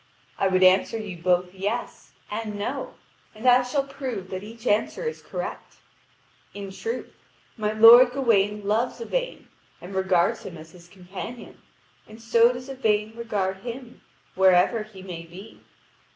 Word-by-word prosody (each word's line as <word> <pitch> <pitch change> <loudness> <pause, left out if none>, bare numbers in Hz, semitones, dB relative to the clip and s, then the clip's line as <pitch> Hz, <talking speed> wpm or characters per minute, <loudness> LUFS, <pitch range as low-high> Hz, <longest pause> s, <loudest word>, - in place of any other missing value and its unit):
I 195 - +3
would 185 0 +2
answer 190 +5 +4
you 205 -5 -6
both 180 0 +1
"yes" 205 +5 -4 0.2
and 210 -1 -4
"no." 255 +7 -4 0.4
And 220 +4 -4
I 250 0 +7
shall 255 +3 -1
prove 260 -9 -6
that 185 0 -4
each 225 +2 -12
answer 215 - 0
is 470 -1 -4
correct. - - -7 0.8
In 200 -1 -7
truth, 455 - -5 0.4
my 215 -2 -2
lord 235 +3 +9
Gawain 210 -6 +1
loves 220 +4 0
Yvain - - -4 0.3
and 180 +3 -10
regards 190 -2 +1
him 170 - -9
as 160 +1 -13
his 175 -1 -16
companion, 190 +6 -9 0.5
and 215 +1 -13
so 230 +1 +4
does 250 +1 -8
Yvain 220 -5 0
regard 205 -5 -2
him, 240 +4 -9 0.3
wherever 190 +4 +4
he 210 -3 -11
may 175 -3 -7
be. 180 +6 -13
215 Hz, 150 wpm, -25 LUFS, 190-245 Hz, 0.8 s, lord